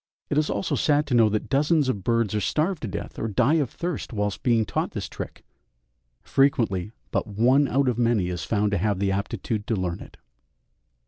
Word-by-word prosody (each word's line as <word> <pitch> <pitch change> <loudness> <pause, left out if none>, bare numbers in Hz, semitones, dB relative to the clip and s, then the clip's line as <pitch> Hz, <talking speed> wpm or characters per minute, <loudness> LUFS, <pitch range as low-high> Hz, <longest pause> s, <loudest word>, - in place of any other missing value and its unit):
It 145 - +1
is 155 - 0
also - - -1
sad 150 0 +2
to 145 - -3
know 115 -2 +5
that 105 0 -2
dozens 150 +1 +2
of 105 -7 -2
birds 115 -1 +1
are 105 - 0
starved 160 - 0
to 115 - -3
death 95 - -6
or 115 - -1
die 125 +9 +2
of 135 - -2
thirst 165 +3 -4
whilst 105 -3 -2
being 115 -3 +2
taught - - -2
this - - -4
trick - - -8 0.8
frequently 115 - +1 0.2
but - - -1
one 125 +7 +3
out 135 +2 +1
of 125 -2 0
many 115 -6 +2
is 90 -1 -4
found 105 -1 0
to 100 - +1
have 105 +1 +1
the 100 0 0
aptitude 100 +2 -3
to 115 - +1
learn 90 -3 -2
it. - - -13
115 Hz, 205 wpm, -25 LUFS, 105-140 Hz, 0.8 s, know